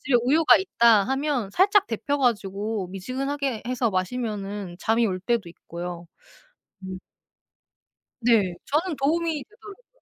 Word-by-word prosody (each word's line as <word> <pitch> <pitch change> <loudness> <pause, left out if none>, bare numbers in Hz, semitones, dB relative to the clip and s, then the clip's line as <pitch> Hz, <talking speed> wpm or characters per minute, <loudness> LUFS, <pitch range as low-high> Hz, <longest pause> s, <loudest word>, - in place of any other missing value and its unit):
집에 260 -2 +2
우유가 300 +6 +5
있다 235 - +4
하면 270 -5 -1
살짝 395 - +4
데워 285 +6 -2
가지고 210 -4 -1
미지근하게 260 +5 -3
해서 250 -2 0
마시면은 200 -2 -3
잠이 225 +1 +2
올 185 -2 -2
때도 220 -2 -1
있고요. 175 0 -8 0.8
음. 185 0 -6 1.2
네. 215 -7 +3
저는 320 +4 0
도움이 320 +1 0
되더라고요. 440 +3 -16
235 Hz, 280 characters per minute, -25 LUFS, 195-290 Hz, 1.2 s, 우유가